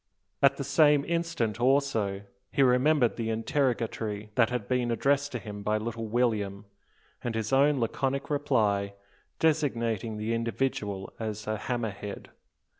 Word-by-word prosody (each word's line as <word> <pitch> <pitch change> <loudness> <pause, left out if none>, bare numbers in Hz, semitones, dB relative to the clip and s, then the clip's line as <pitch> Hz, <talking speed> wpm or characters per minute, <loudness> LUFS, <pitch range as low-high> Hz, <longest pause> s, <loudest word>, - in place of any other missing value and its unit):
At 140 -1 +5
the 140 - -3
same 145 0 +4
instant, 165 -11 -1
also, 120 -7 +1 0.3
he 140 - +3
remembered 130 0 +3
the 115 -1 -2
interrogatory 115 -3 -1
that 115 0 +3
had 120 -5 -3
been 125 -1 0
addressed 140 +4 +1
to - - -1
him 105 -3 -7
by 105 +1 +1
little 115 +1 -4
William, 105 -4 0 0.6
and 120 -2 -2
his 110 +3 -2
own 140 +1 +4
laconic 135 +4 -1
reply 105 -9 +1 0.4
designating 115 -9 0
the 110 +2 -2
individual 115 -4 -2
as 110 -2 -4
a 110 - -1
hammer 115 0 -2
head. 100 +1 -8
115 Hz, 140 wpm, -28 LUFS, 110-140 Hz, 0.6 s, At